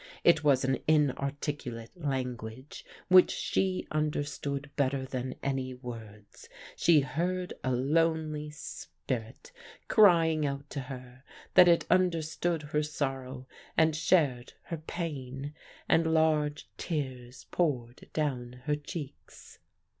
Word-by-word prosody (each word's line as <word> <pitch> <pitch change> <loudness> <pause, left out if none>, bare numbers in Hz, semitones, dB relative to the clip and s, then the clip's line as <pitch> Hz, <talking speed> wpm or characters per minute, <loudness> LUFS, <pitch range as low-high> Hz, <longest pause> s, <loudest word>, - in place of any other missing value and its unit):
It 165 -3 +5
was 140 -3 +4
an 130 0 +1
inarticulate 140 -5 0
language 130 -4 -4 0.2
which 185 0 +7
she 190 -1 0
understood 145 -2 -2
better 135 -1 0
than 130 -1 -4
any 130 -2 -2
words. 110 -4 -10 0.3
She 160 -4 +5
heard 180 +7 -2
a 130 - 0
lonely 155 +3 +1
spirit 130 - -6 0.4
crying 165 -7 +5
out 140 0 -2
to 145 - -3
her, 130 -1 -9 0.3
that 180 -1 +8
it 170 -1 +4
understood 170 -2 +1
her 150 0 0
sorrow 135 -3 -3 0.3
and 160 -1 +4
shared 150 -7 +2
her 165 - -5
pain. 145 -4 -5 0.3
And 160 0 +3
large 155 -2 +2
tears 130 -5 -4
poured 125 -8 -1
down 125 -5 -2
her 150 - +2
cheeks. 145 - -9
145 Hz, 110 wpm, -30 LUFS, 130-160 Hz, 0.4 s, that